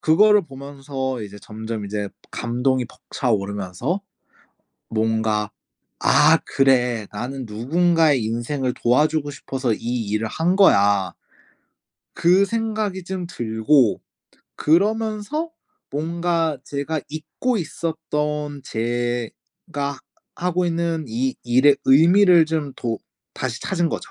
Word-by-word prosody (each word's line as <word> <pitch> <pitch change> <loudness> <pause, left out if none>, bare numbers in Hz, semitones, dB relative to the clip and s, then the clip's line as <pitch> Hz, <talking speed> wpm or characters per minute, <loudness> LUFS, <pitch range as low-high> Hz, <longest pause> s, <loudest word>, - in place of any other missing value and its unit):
그거를 210 +6 +5
보면서 135 -3 -5
이제 105 0 -9
점점 110 0 -6
이제 100 0 -3 0.2
감동이 125 +2 0
벅차오르면서 105 - -2 0.9
뭔가 110 -1 0 0.5
'아 160 +2 +5
그래. 125 -5 +2
나는 130 +5 -5
누군가의 150 +4 +2
인생을 125 +3 -2
도와주고 145 +4 +2
싶어서 135 -4 -3
이 120 -2 -3
일을 110 +1 -1
한 175 - 0
거야.' 100 - +4 1.0
그 185 +4 +4
생각이 215 -4 -2
좀 185 -1 -4
들고 115 - +2 0.6
그러면서 215 - +1 0.4
뭔가 165 +1 -1
제가 145 +2 -3
잊고 200 +10 -2
있었던 150 -3 -3
제가 120 - -3 0.4
하고 180 0 0
있는 170 -2 -1
이 125 +4 -1
일의 130 +4 +5
의미를 170 +4 +6
좀 155 -4 -2
도 115 -3 -3 0.4
다시 125 -3 -4
찾은 175 -3 0
거죠. - - -5
140 Hz, 220 characters per minute, -22 LUFS, 120-170 Hz, 1.0 s, 의미를